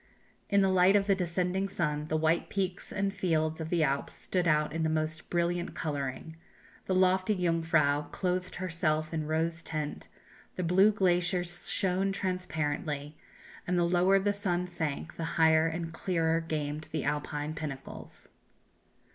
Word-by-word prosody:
In 200 -1 +4
the 195 - +4
light 185 +1 +5
of 200 -1 +4
the 200 - +4
descending 180 +1 0
sun 150 -5 -2
the 155 - 0
white 160 +2 +1
peaks 190 -2 -2
and 200 -1 -1
fields 160 -4 0
of 160 - -4
the 170 -2 +2
Alps 140 -1 -1
stood 180 -2 -1
out 150 -1 +2
in 165 - -2
the 160 - +1
most 155 0 -2
brilliant 175 0 -1
colouring; 145 0 -4 0.5
the 185 - +1
lofty 185 +2 +3
Jungfrau 165 -5 +2
clothed 185 +1 -2
herself 160 -3 -1
in 155 -2 -2
rose 160 +1 0
tint, 155 -3 -4 0.5
the 185 - -2
blue 190 +5 +5
glaciers 180 -2 0
shone 195 0 +1
transparently, 155 -6 -2 0.5
and 180 0 +1
the 175 - +3
lower 180 +2 +4
the 205 +1 +1
sun 180 -3 -1
sank 165 -2 -4
the 165 - -3
higher 160 0 +5
and 165 0 -4
clearer 165 -2 0
gleamed 155 -1 -4
the 160 - -2
Alpine 150 +1 -2
pinnacles.... 145 -4 -7
170 Hz, 155 wpm, -30 LUFS, 155-185 Hz, 0.5 s, light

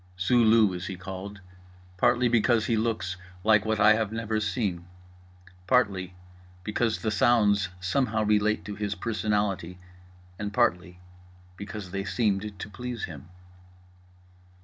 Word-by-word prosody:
Zulu 110 0 +4
is 90 0 -5
he 95 - -5
called, 95 +2 -8 0.6
partly 120 +3 +3
because 115 -1 +2
he 115 - +1
looks 110 -5 -1 0.3
like 110 -1 +4
what 110 -1 0
I 105 +1 +7
have 110 -1 -1
never 110 -1 -2
seen, 100 -5 -2 0.8
partly 95 -7 +1 0.5
because 110 +2 -1
the 110 - 0
sounds 105 -3 +3
somehow 110 +3 0
relate 105 0 +1
to 105 - -5
his 105 0 -3
personality 105 -4 -1 0.6
and 105 -1 -3
partly 90 -2 0 0.6
because 100 -1 -8
they 100 +1 -3
seemed 105 -1 -1
to 100 - -7
please 120 +3 -6
him. 80 0 -7
105 Hz, 125 wpm, -27 LUFS, 95-110 Hz, 0.8 s, I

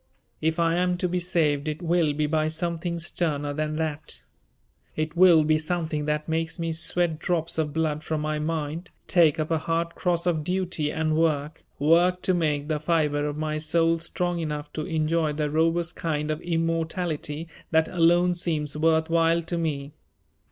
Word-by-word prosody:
If 160 +1 0
I 165 0 +3
am 180 0 +1
to 180 - 0
be 180 +1 -1
saved 160 -5 0
it 155 0 -3
will 170 -3 +2
be 150 +1 0
by 155 +1 +1
something 170 +1 -3
sterner 155 -4 -1
than 155 +1 -2
that; 155 - -4 0.7
it 155 +1 -2
will 170 -3 +7
be 155 0 +2
something 160 -2 -2
that 150 0 -1
makes 160 0 -2
me 165 -1 -2
sweat 170 0 +1
drops 165 -2 -1
of 150 -2 0
blood 155 -1 -1
from 155 -1 -2
my 155 0 -1
mind, 160 +2 -3 0.2
take 165 -4 +4
up 155 +1 -2
a 160 - +2
hard 165 +1 -1
cross 175 -2 -1
of 165 -4 +1
duty 180 -3 -1
and 155 0 0
work, 155 -1 0
work 175 +5 +3
to 185 - +3
make 150 -4 0
the 155 -1 -1
fibre 150 -2 +1
of 145 0 -4
my 155 0 -2
soul 165 +1 +2
strong 175 +1 -2
enough 150 -2 -4
to 155 - -4
enjoy 160 -1 0
the 150 -1 -2
robust 165 +2 +1
kind 155 -2 -1
of 155 +2 -3
immortality 165 -2 -2 0.2
that 160 -1 +3
alone 175 +1 +3
seems 155 -4 -2
worth 160 +1 +2
while 165 0 +2
to 170 +1 -3
me. 145 -4 -3
160 Hz, 180 wpm, -25 LUFS, 155-170 Hz, 0.7 s, will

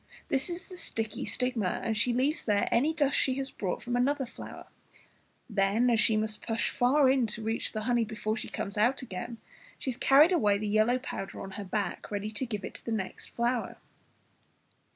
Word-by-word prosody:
This 270 +5 0
is 350 +2 -6
the 365 - -9
sticky 220 -9 -3
stigma, 245 -7 0
and 225 - 0
she 230 +3 +3
leaves 270 +6 0
there 205 -1 +2
any 275 +7 +3
dust 290 -3 +1
she 260 - +2
has 270 0 -3
brought 190 -3 -3
from 245 0 -2
another 270 +3 +1
flower; 235 - -10 0.8
then, 210 +3 +2
as 230 - +3
she 220 -1 +4
must 215 0 -1
push 225 -1 0
far 265 +3 +4
in 260 -3 +3
to 215 +1 -2
reach 225 +1 -1
the 215 - -3
honey, 240 +1 +2
before 215 -1 -2
she - - -5
comes 200 +1 -4
out 250 +5 +3
again 230 +2 -6 0.5
has 255 -3 -2
carried 285 +7 +6
away 210 - +3
the 210 +1 -3
yellow 215 +4 +3
powder 250 -7 -6
on 195 - -7
her 205 - -6
back, 200 -1 -3
ready 210 +1 -3
to 235 +5 -1
give 210 -4 -4
it - - -7
to - - -6
the 230 - -3
next 205 -4 -3
flower. 240 0 -1
230 Hz, 200 wpm, -29 LUFS, 210-260 Hz, 0.8 s, carried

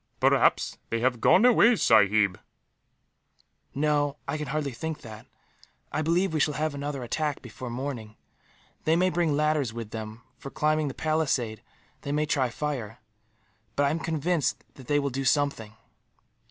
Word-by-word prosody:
"Perhaps - - +3
they 115 0 -1
have 120 -2 +1
gone 205 - +5
away, 240 -1 +6
sahib." 105 - +4 1.4
"No, 145 0 +1
I 140 - -2
can 150 - -4
hardly 145 0 -2
think 155 +5 -5
that. 110 -1 -11 0.6
I 155 - -1
believe 170 +3 +1
we 155 - 0
shall 150 0 +1
have 155 -1 -1
another 140 -2 -4
attack, 150 +4 -2
before 125 +1 -8
morning. 120 -3 -5 0.7
They 160 - +3
may 185 +2 +2
bring 165 -5 +1
ladders 150 -6 +1
with 115 -2 -7
them, 110 +1 -7 0.2
for 135 - -7
climbing 155 +1 +1
the 135 - -5
palisade; 140 -9 -1 0.4
they 140 - -4
may 150 +1 +1
try 135 -4 +1
fire; 120 -5 -4 0.8
but 145 - +2
I 140 - +2
am 160 - -1
convinced 160 -2 -1
that 130 - -14
they 145 - +2
will 140 -1 0
do 135 +2 -3
something. 135 -6 0
145 Hz, 160 wpm, -27 LUFS, 120-155 Hz, 1.4 s, away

